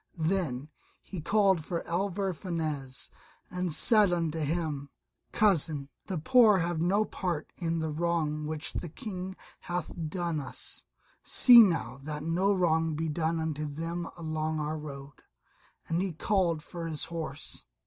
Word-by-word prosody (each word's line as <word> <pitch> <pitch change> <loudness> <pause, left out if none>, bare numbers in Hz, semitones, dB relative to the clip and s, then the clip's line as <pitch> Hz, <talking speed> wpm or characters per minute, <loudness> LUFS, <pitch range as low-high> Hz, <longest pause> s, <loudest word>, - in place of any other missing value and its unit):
Then 160 -5 -1 0.3
he 185 -5 -6
called 195 -1 +3
for 170 +1 -3
Alvar 190 +2 -1
Fanez 155 -7 -4 0.4
and 180 -1 -2
said 210 +4 +5
unto 165 -2 0
him, 150 -2 -2 0.4
"Cousin, 160 -8 +2 0.2
the 190 - -2
poor 220 +4 +6
have 170 -2 -1
no 200 +5 +3
part 175 -7 -3
in 165 -2 -2
the 160 -1 -2
wrong 155 -2 -1
which 155 +1 -3
the 175 - -4
King 190 - -6 0.2
hath 175 -1 -4 0.2
done 170 -3 -2
us; 135 -3 -7 0.4
see 245 -2 +8
now 165 - +1
that 150 +1 -5
no 175 +5 +2
wrong 165 -4 +2
be 160 +1 -2
done 160 +2 0
unto 155 -1 -2
them 165 +3 -4
along 155 -1 -2
our 155 +1 -2
road," 140 -2 -9 0.7
and 165 +2 0
he 190 -1 -1
called 170 -2 +1
for 170 -1 -6
his 155 -2 -2
horse. 160 -4 -5
165 Hz, 145 wpm, -29 LUFS, 155-180 Hz, 0.7 s, see